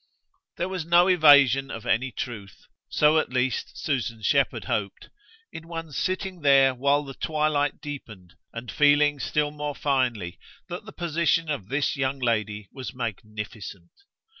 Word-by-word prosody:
There 175 Hz, -, -1 dB
was 190 Hz, -3 st, -4 dB
no 175 Hz, +2 st, +5 dB
evasion 140 Hz, -6 st, +6 dB
of 115 Hz, -, -7 dB
any 130 Hz, +4 st, +1 dB
truth 105 Hz, -7 st, -7 dB, 0.3 s
so 150 Hz, +1 st, +4 dB
at -, -, -2 dB
least 125 Hz, 0 st, -2 dB
Susan 120 Hz, -6 st, -2 dB
Shepherd -, -, +1 dB
hoped 100 Hz, -2 st, -3 dB, 0.4 s
in 165 Hz, +1 st, -9 dB
one's 165 Hz, -3 st, -7 dB
sitting 185 Hz, -1 st, -2 dB
there 135 Hz, -2 st, +5 dB
while 140 Hz, +3 st, +2 dB
the 135 Hz, -1 st, -8 dB
twilight 150 Hz, -1 st, 0 dB
deepened 110 Hz, -, -9 dB, 0.2 s
and 115 Hz, -2 st, -7 dB
feeling 145 Hz, +2 st, +4 dB
still 150 Hz, +3 st, 0 dB
more 150 Hz, -1 st, -4 dB
finely 120 Hz, -12 st, -1 dB, 0.3 s
that 175 Hz, +3 st, -6 dB
the 220 Hz, -, -9 dB
position 165 Hz, -2 st, 0 dB
of 110 Hz, -10 st, -4 dB
this 140 Hz, +4 st, 0 dB
young 135 Hz, 0 st, -1 dB
lady 110 Hz, -4 st, -1 dB
was 130 Hz, -1 st, -7 dB
magnificent. 105 Hz, -5 st, -6 dB
140 Hz, 145 wpm, -25 LUFS, 115-150 Hz, 0.4 s, evasion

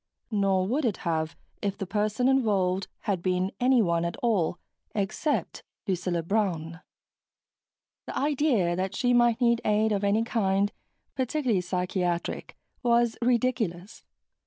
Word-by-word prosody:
Not 195 Hz, -3 st, +2 dB
would 255 Hz, +11 st, 0 dB
it 225 Hz, -6 st, 0 dB
have, 160 Hz, -1 st, -1 dB, 0.3 s
if 200 Hz, -1 st, -2 dB
the 195 Hz, -, -3 dB
person 210 Hz, +5 st, 0 dB
involved 200 Hz, -8 st, +2 dB
had 195 Hz, -5 st, -1 dB
been 185 Hz, +1 st, 0 dB
anyone 225 Hz, -10 st, +3 dB
at 170 Hz, 0 st, -3 dB
all 200 Hz, -8 st, +1 dB, 0.4 s
except 210 Hz, +9 st, -1 dB, 0.3 s
Lucilla 180 Hz, -2 st, -1 dB
Brown. 170 Hz, -4 st, -1 dB, 1.3 s
The -, -, -4 dB
idea 270 Hz, -, +2 dB
that 190 Hz, +2 st, -2 dB
she 245 Hz, -1 st, +2 dB
might 240 Hz, -1 st, +4 dB
need 235 Hz, -1 st, +3 dB
aid 215 Hz, +1 st, +2 dB
of 205 Hz, -1 st, 0 dB
any 205 Hz, +3 st, +2 dB
kind, 200 Hz, -3 st, +1 dB, 0.4 s
particularly 255 Hz, -6 st, 0 dB
psychiatric, 180 Hz, -1 st, -2 dB, 0.3 s
was 235 Hz, -1 st, +3 dB
ridiculous. 235 Hz, -6 st, 0 dB
205 Hz, 125 wpm, -27 LUFS, 180-235 Hz, 1.3 s, might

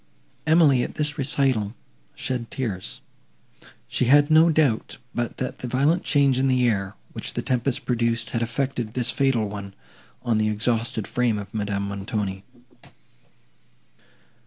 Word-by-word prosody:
Emily, 155 Hz, -5 st, +5 dB
at -, -, -4 dB
this 150 Hz, 0 st, -1 dB
recital, 130 Hz, -6 st, 0 dB, 0.4 s
shed 120 Hz, -3 st, -3 dB
tears. 110 Hz, -9 st, -4 dB, 0.9 s
She -, -, 0 dB
had 145 Hz, +4 st, +5 dB
no 160 Hz, +2 st, +7 dB
doubt 150 Hz, -8 st, +1 dB, 0.2 s
but 120 Hz, -1 st, -3 dB
that 130 Hz, -, -4 dB
the 125 Hz, -, -4 dB
violent 145 Hz, +8 st, +2 dB
change 140 Hz, -3 st, +3 dB
in 135 Hz, -, +2 dB
the 130 Hz, -1 st, +3 dB
air, 100 Hz, -3 st, -1 dB, 0.2 s
which -, -, -4 dB
the -, -, -2 dB
tempest 130 Hz, +1 st, -1 dB
produced, 115 Hz, -2 st, 0 dB
had 115 Hz, -, -1 dB
effected 120 Hz, -1 st, -2 dB
this 125 Hz, -1 st, +2 dB
fatal 130 Hz, -6 st, +1 dB
one, 100 Hz, -1 st, -7 dB, 0.5 s
on 115 Hz, -3 st, +1 dB
the 110 Hz, 0 st, +2 dB
exhausted 115 Hz, +1 st, 0 dB
frame 120 Hz, -3 st, +1 dB
of 100 Hz, -1 st, -7 dB
Madame 100 Hz, -2 st, -2 dB
Montoni. 100 Hz, -1 st, -3 dB
120 Hz, 140 wpm, -24 LUFS, 110-135 Hz, 0.9 s, no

